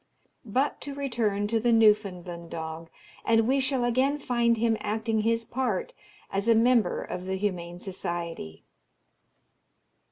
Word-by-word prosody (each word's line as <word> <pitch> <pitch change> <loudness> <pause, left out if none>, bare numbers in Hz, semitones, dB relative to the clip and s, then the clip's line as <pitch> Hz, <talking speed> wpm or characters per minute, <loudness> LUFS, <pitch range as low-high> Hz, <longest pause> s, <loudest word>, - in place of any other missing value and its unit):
But 260 +7 0
to 285 -1 -6
return 230 -7 0
to 225 +2 +1
the 240 +2 +2
Newfoundland 190 -6 +2
dog, 160 0 -6 0.3
and 225 0 +3
we 270 +2 +3
shall 265 -1 +1
again 260 +4 +2
find 235 -4 +1
him 225 0 +2
acting 220 +1 -1
his 230 +1 +1
part 235 -5 -2 0.4
as 195 +3 -1
a 230 - +6
Member 230 -4 +3
of 180 +1 -6
the 190 - -1
Humane 180 -3 -3
Society. 170 - -5
220 Hz, 135 wpm, -27 LUFS, 185-240 Hz, 0.4 s, a